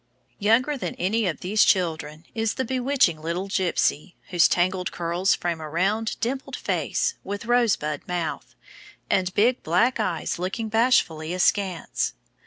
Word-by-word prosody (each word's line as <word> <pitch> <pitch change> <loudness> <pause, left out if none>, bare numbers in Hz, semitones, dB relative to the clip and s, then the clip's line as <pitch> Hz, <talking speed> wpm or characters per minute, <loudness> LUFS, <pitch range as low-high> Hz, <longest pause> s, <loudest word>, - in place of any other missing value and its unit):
Younger 250 +7 +2
than 180 -6 -4
any 205 +4 0
of 170 - -3
these 210 +4 +3
children 160 -4 0
is 225 -2 -1
the 260 - -1
bewitching 255 - +1
little 170 +4 -3
gypsy, 185 -3 0
whose 175 -2 +5
tangled 180 +1 0
curls 175 +3 +1
frame 170 -2 -3
a 155 - -6
round, 200 +7 0
dimpled 265 +3 -3
face, 470 - -1
with 200 +3 -5
rosebud 225 -11 +1
mouth, 175 -3 -4 0.6
and 185 -1 +2
big 240 +5 +3
black 205 +10 +2
eyes 180 -5 -2
looking 195 +5 -3
bashfully 180 -8 +2
askance. 185 - 0
190 Hz, 140 wpm, -24 LUFS, 170-225 Hz, 0.6 s, whose